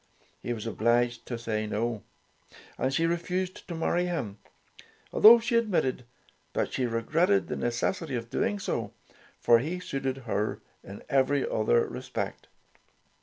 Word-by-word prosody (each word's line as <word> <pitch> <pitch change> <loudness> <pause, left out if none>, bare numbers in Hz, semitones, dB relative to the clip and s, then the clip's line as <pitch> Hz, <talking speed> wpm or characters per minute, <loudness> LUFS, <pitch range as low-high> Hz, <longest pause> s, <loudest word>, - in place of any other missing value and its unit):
He 120 - -4
was 115 -2 -4
obliged 120 +2 +1
to 120 - -3
say 110 -2 -2
no, 110 +1 -2 0.7
and 130 - -1
she 165 +4 +1
refused 180 +3 -2
to 175 - -5
marry 175 +2 +1
him, 115 - -3 0.7
although 230 +2 +9
she 230 +1 -1
admitted 180 - +1 0.5
that - - -1
she 130 -2 0
regretted 160 - +2
the - - -4
necessity 130 +5 -1
of 115 -1 -5
doing 205 - 0
so, 115 - -3 0.5
for 115 -1 +5
he 165 +9 -3
suited 135 -6 -3
her 105 -2 -1 0.2
in 100 +1 -10
every 135 0 +2
other 115 +2 +2
respect. - - -5
130 Hz, 140 wpm, -28 LUFS, 115-175 Hz, 0.7 s, although